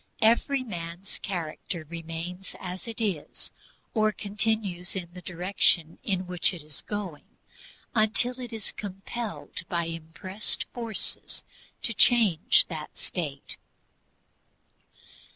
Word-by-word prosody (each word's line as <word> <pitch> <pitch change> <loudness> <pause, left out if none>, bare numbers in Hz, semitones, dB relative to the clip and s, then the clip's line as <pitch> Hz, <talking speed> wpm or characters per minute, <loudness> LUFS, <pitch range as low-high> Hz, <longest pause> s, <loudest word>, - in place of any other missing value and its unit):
Every 255 +4 +5
man's 175 -3 -5
character 170 -2 -3
remains 170 +3 -5
as 185 +3 -5
it 230 0 -5
is, 195 -9 -2 0.4
or 215 -2 +4
continues 205 -4 0
in 175 -2 -3
the 180 - -8
direction 175 -2 +2
in 190 -3 0
which 180 +1 +2
it 165 - -8
is 150 -2 -5
going, 200 -7 -5 0.6
until 240 +3 +3
it 245 -1 -5
is 220 -3 -2
compelled 205 +3 -4
by 170 -2 +1
impressed 165 +5 -1
forces 230 -4 0 0.4
to 230 - +4
change 215 -10 +6
that 155 -3 -5
state. 145 -6 -3
185 Hz, 110 wpm, -29 LUFS, 170-215 Hz, 0.6 s, change